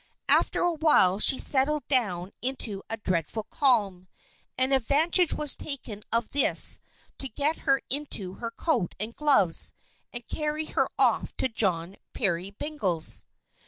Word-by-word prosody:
After - - +2
a 350 -1 +1
while 295 - +2
she 265 - +6
settled 290 +2 +2
down 200 -9 0
into 235 -6 0
a 225 - -3
dreadful 185 +1 -3
calm, 210 - -1 0.5
and 260 +1 0
advantage 305 +7 +1
was 295 -3 +3
taken 240 -7 -6
of 230 0 +1
this 285 - +4 0.4
to 270 - +2
get 300 +4 -2
her 270 0 +2
into 260 -10 0
her 230 +3 -6
coat 235 - -2
and 220 +3 -6
gloves, 275 - +2 0.4
and 240 -1 -8
carry 300 0 -3
her - - -1
off - - 0
to - - 0
John 190 -5 -1 0.2
Peerybingle's. 195 - 0
240 Hz, 135 wpm, -26 LUFS, 195-290 Hz, 0.5 s, she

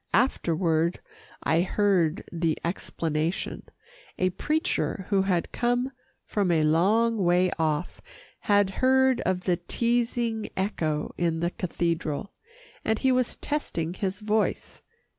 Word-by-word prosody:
Afterward, 170 - +1 0.4
I 165 +1 +3
heard 185 -4 +1
the 165 -2 0
explanation. 165 -1 -2 0.6
A 185 0 +1
preacher 300 - -1
who 200 -2 +3
had 185 -3 0
come 245 +2 0 0.3
from 200 -3 0
a 165 -2 +3
long 210 +9 +3
way 180 +1 +3
off, 155 0 -1 0.4
had 205 -2 +3
heard 265 -1 +4
of 185 -1 +1
the 180 -1 +1
teasing 235 +3 -1
echo 160 -6 -1
in 165 -2 +1
the 170 +1 0
cathedral, 170 -1 -2 0.5
and 220 0 +1
he 265 - +2
was 255 -1 +1
testing 175 - -2
his 195 +2 -3
voice. 215 0 -1
185 Hz, 120 wpm, -27 LUFS, 170-225 Hz, 0.6 s, heard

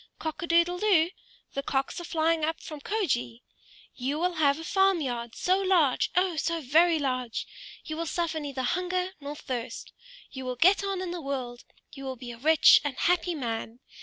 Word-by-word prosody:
Cock 315 +1 -5
a 340 - -3
doodle 340 +1 +3
doo! 360 -5 +3 0.4
The 275 - -2
cocks 275 +5 -2
are - - -7
flying 325 -1 +1
up 320 +1 -1
from 305 -3 -9
Kjoge! 250 - -2 0.5
You 270 +4 -2
will 355 +2 0
have 290 -3 +2
a 325 - -7
farm 385 +2 +3
yard, 240 -5 -4
so 370 +1 +2
large, 360 -9 +2
oh! 360 -2 +2
so 335 +1 0
very 320 +4 +4
large! 255 -5 -2 0.4
You 310 - -5
will 335 0 -3
suffer 335 -1 -1
neither 280 -3 -4
hunger 365 +5 -1
nor 285 +1 -6
thirst! 250 -4 -6 0.4
You 265 -1 -7
will 250 0 -3
get 375 +9 +4
on 390 -2 -2
in 365 -2 -4
the 350 -1 -5
world! 255 -4 -5 0.3
You 275 -1 -8
will 260 -1 -4
be 245 0 -8
a 235 - -10
rich 315 +4 +6
and 290 -3 -3
happy 355 0 +1
man! 230 -3 -4
315 Hz, 190 wpm, -28 LUFS, 265-350 Hz, 0.5 s, rich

